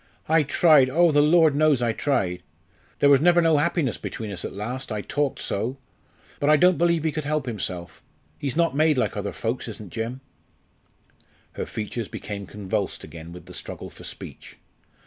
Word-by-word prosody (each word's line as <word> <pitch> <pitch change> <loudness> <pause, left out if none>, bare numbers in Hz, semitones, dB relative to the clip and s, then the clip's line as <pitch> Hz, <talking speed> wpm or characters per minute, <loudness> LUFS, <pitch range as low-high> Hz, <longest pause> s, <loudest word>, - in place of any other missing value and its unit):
I 160 +1 +4
tried, 145 -2 +5
oh! 170 +4 +4
the 145 0 +4
Lord 160 0 +5
knows 150 -2 +3
I 120 -2 +1
tried! 100 -11 -1 0.6
There 145 - +4
was 140 -1 +6
never 175 +1 +5
no 165 -2 +4
happiness 150 - 0
between 110 -2 -5
us 90 -3 -5
at - - -4
last, 120 +6 -5
I 105 -1 -2
talked 145 +5 -1
so. 115 +7 -2 0.6
But 145 - +1
I 155 - +6
don't 180 +2 +4
believe 170 -2 +2
he 160 - +1
could 155 0 -3
help 150 -1 -1
himself 90 -7 -4 0.4
he's 140 -3 -3
not 165 -4 +2
made 155 -1 +3
like 125 - 0
other 100 -1 -3
folks, 120 +2 -3
isn't 105 -4 -9
Jim 115 +4 -4 0.6
" - - -36
Her - - -4
features 110 +1 -4
became 100 -2 -6
convulsed 100 -2 -3
again 80 +1 -10
with 90 +1 -11
the - - -12
struggle - - -6
for - - -13
speech. - - -9
135 Hz, 185 wpm, -24 LUFS, 105-155 Hz, 0.6 s, was